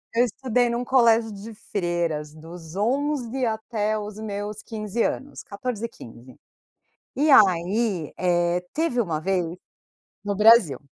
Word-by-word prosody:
eu 240 +2 +4
estudei 245 0 0
num 235 +1 -2
colégio 230 -3 +3
de 210 +3 -9
freiras 170 -7 -3
dos 165 +1 -11
11 260 +3 -1
até 220 -1 -1
os 210 0 -7
meus 210 -1 -5
15 220 0 -3
anos, 285 +2 -4
14, 230 +2 -4
15. 125 - -14 0.8
E 300 +3 +2
aí, 190 - +3
eh, 175 0 +1
teve 305 -6 0
uma 165 -8 -2
vez 185 +1 0 0.8
no 205 -1 -2
Brasil. 215 - +5
210 Hz, 125 wpm, -24 LUFS, 175-235 Hz, 0.8 s, Brasil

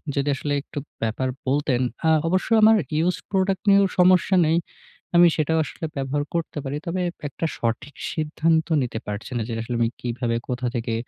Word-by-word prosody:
যদি 140 0 0
আসলে 145 +2 -3
একটু 145 - -7 0.2
ব্যাপার 115 +4 -1 0.2
বলতেন, 135 -2 +1 0.3
আ - - +5 0.2
অবশ্যই 185 +6 +2
আমার 220 +1 +8 0.2
ইউজড 175 +3 0
প্রোডাক্ট 190 -1 +1
নিয়েও 200 0 +6
সমস্যা 185 +1 +5
নেই। 160 - +3 0.6
আমি 175 0 +8
সেটাও 160 +1 +1
আসলে 160 - -6
ব্যবহার 140 +2 -1
করতে 165 -2 -2
পারি। 135 +2 -3
তবে 185 +2 -1 0.3
একটা 165 - -4
সঠিক 120 +5 -3 0.2
সিদ্ধান্ত 160 +1 +1 0.2
নিতে 115 -3 -4
পারছি 105 +5 -5
না - - -1
যে - - -3
আসলে 120 +1 -4
আমি 115 - +3
কিভাবে 120 -1 -2
কোথা 125 0 -2
থেকে 115 -1 -2
145 Hz, 175 wpm, -23 LUFS, 125-170 Hz, 0.6 s, আমার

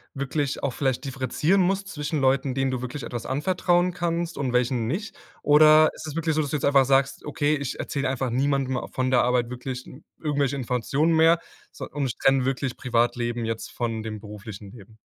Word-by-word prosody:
wirklich 140 +1 -2
auch 135 -3 0
vielleicht 135 0 -1
differenzieren 135 +8 +1
musst 195 +2 0
zwischen 150 -2 -3
Leuten, 135 0 +1
denen 135 -1 0
du 125 -1 -3
wirklich 125 +1 -5
etwas 120 -1 -5
anvertrauen 175 +4 +1
kannst 170 -2 -2
und 130 -3 -1
welchen 125 -2 +1
nicht? 195 - -3 0.3
Oder 155 +1 +7
ist 155 - -9
das 155 - -6
wirklich 160 -1 0
so, 155 - +1
dass 145 - -3
du - - -2
jetzt - - -2
einfach 140 -2 +5
sagst: 135 0 +1
„Okay, 150 0 +1
ich 140 -3 -4
erzähle 140 -2 -2
einfach 130 -2 -2
niemandem 135 -1 0
von 130 0 -1
der 125 - +5
Arbeit 125 -1 +1
wirklich 125 0 -6 0.3
irgendwelche 145 -3 0
Informationen 135 +6 0
mehr, 165 +1 +5 0.3
so, - - -7
und 140 -4 -2
trenne 135 -1 +3
wirklich 135 -1 -1
Privatleben 120 -1 0
jetzt 115 0 -4
von 115 -2 -3
dem 110 -1 -6
beruflichen 105 -1 -9
Leben?“ 110 -1 -15
135 Hz, 190 wpm, -25 LUFS, 125-150 Hz, 0.3 s, Oder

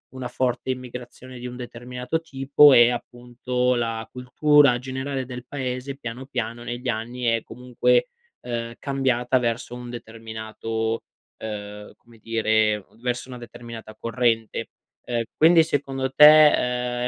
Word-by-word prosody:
una 130 -1 -5
forte 125 0 -2
immigrazione 125 0 -8
di 125 - -6
un 125 - -8
determinato 125 +4 -5
tipo 140 -1 +5
e 120 -1 +7
appunto 125 +1 -2
la 115 -2 -2
cultura 135 +1 +4
generale 130 +1 -4
del 125 -1 -8
paese, 130 0 -4
piano 125 0 -7
piano 120 -3 -4
negli 120 +1 -5
anni 120 +2 -4
è 115 -1 +1
comunque, 125 - +1 0.3
ehm, 115 -1 -4
cambiata 130 -2 +1
verso 120 0 -2
un 125 0 -8
determinato, 110 -1 -5 0.3
ehm, 105 -1 -7
come 120 -1 -21
dire 110 -2 +1 0.2
verso 125 0 -2
una 125 -1 -8
determinata 115 -2 -10
corrente. 115 -2 -1 0.3
Ehm, 120 -1 -2
quindi 165 +1 +6
secondo 135 -3 -2
te, 125 -5 +6
ehm, 125 - 0
125 Hz, 130 wpm, -24 LUFS, 115-130 Hz, 0.3 s, e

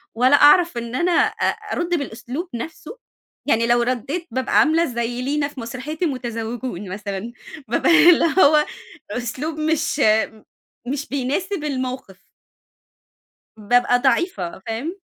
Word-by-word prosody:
والَّا 255 +4 +5
أعرف 295 0 +5
إن 235 +1 -5
أنا 350 +5 +1
أ 430 +5 +1 0.3
أرد 345 0 -2
بالأسلوب 265 +6 -6
نفسه، 320 - -8 0.5
يعني 230 -2 +2
لو 240 0 +3
رديت 270 +8 -2
بابقى 260 0 +1
عاملة 325 +2 +3
زي 240 -1 -3
لينا 285 +2 -1
في 285 -3 -11
مسرحية 255 +7 -6
المتزوجون 240 - -4
مثلًا، 200 +3 -5 0.4
بابقى 310 +8 +5
اللي 340 - +5
هو 300 -2 +5 0.5
أسلوب 270 +6 -4
مش 310 -1 0 0.9
مش 285 +3 -3
بيناسب 295 +7 -2
الموقف. 255 -8 -5 1.3
بابقى 245 +3 +2
ضعيفة، 265 - 0
فاهم؟ 275 - -4
260 Hz, 120 wpm, -21 LUFS, 235-310 Hz, 1.3 s, والَّا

